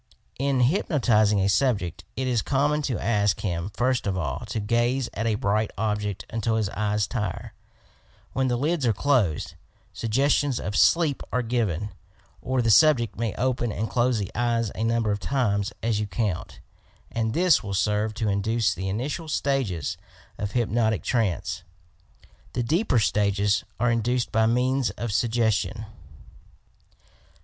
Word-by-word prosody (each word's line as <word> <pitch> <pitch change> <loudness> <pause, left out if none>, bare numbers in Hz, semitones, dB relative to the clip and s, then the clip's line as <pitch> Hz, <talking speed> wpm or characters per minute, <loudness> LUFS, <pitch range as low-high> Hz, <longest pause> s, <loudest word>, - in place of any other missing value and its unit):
In 135 -1 +1
hypnotizing 120 - +3
a 95 - +2
sub 125 +3 +3
ject 90 -1 -7
it 130 - -2
is 120 -3 +1
common 145 +4 +1
to 130 -6 -1
ask 105 -3 +1
him 90 -2 -2
first 125 -2 0
of 95 -1 -1
all 80 -7 -2
to 110 - -3
gaze 120 +4 0
at 115 - -2
a 110 - +1
bright 105 +1 0
object 105 -2 -2
until 110 0 0
the 100 -3 -1
eyes 105 -1 +1
tire,— 105 -7 -4 0.8
when 130 0 +1
the 120 -1 0
lids 150 +3 0
are 115 - +3
closed, 105 - +1 0.4
suggestions 135 +3 +1
of 100 +2 -4
sleep 160 -1 +3
are 125 - 0
given, 110 -5 -1 0.5
or 130 0 0
the 115 - +3
subject 125 -1 +5
may 115 -4 -2
open 125 -2 0
and 110 +2 -3
close 120 -1 +2
the 100 -3 -3
eyes 115 -2 0
a 110 - -3
number 115 -1 +1
of 100 - -1
times 105 -7 0
as 110 -2 +1
you 105 - -2
count, 100 -3 -3 0.5
and 115 0 -1
this 180 -2 +4
will 100 -2 -4
serve 105 +2 0
to 110 -1 -1
induce 105 +1 +1
the 95 +2 -4
initial 135 - -3
stages 105 - -1 0.4
of 105 -1 -3
hypnotic 115 -2 +1
trance; 95 -5 -1 0.9
the 125 - -1
deeper 155 - +1
stages 105 -1 +2 0.2
are 120 +1 +2
induced 120 +2 0
by 110 0 +3
means 125 +2 +1
of 120 -3 -3
sug 120 +3 +1
gestion. 110 -2 0
115 Hz, 155 wpm, -25 LUFS, 105-125 Hz, 0.9 s, subject